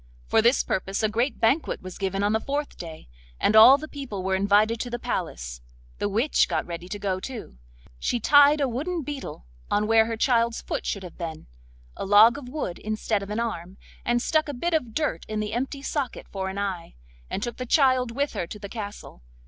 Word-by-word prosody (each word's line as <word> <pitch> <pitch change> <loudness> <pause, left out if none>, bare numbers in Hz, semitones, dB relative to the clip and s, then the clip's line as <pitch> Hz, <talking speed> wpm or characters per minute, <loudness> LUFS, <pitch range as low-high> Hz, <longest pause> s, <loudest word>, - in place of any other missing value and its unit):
For 220 - +3
this 235 +4 +4
purpose 195 +3 -2
a 215 - +3
great 235 +6 -1
banquet 250 - +1
was 185 -1 -8
given 195 0 -1
on 205 +1 +2
the 220 - +2
fourth 285 +4 -3
day, 160 -2 -9 0.3
and 215 - +2
all 245 +5 +10
the 310 +2 -7
people 265 -11 -6
were 190 0 0
invited 205 +4 +3
to 245 - -3
the 240 - -3
palace. - - -4 0.4
The 205 - 0
witch 230 +9 +2
got 165 -3 -1
ready 170 +1 -7
to 205 - -4
go 195 -2 -2
too. 220 - -8 0.4
She 240 - 0
tied 290 +4 +6
a 275 - +2
wooden 310 +8 -3
beetle 270 - -7 0.2
on 210 +1 +1
where 225 0 +4
her 225 -1 -3
child's 235 -1 +2
foot - - -4
should 200 - -2
have 180 0 -11
been, 160 -2 -6 0.5
a - - -5
log 215 +7 +6
of 250 -3 -10
wood 255 - -4
instead 215 -1 -1
of 200 - -7
an 210 +2 -2
arm, 190 -5 -4 0.3
and 240 0 +1
stuck 310 -1 +1
a 285 - -4
bit 340 +7 -2
of 250 -9 -1
dirt 300 - -1
in 215 0 -2
the 215 0 -3
empty 270 +3 -3
socket 280 -3 -3
for 190 -1 -3
an 190 - -6
eye, 190 -4 -4 0.3
and 200 - -3
took 240 -2 -4
the 255 - -5
child 255 -3 +3
with 280 +5 -2
her 170 - -3
to 210 - -8
the 200 -1 -8
castle. 205 - -8
220 Hz, 220 wpm, -25 LUFS, 195-260 Hz, 0.5 s, all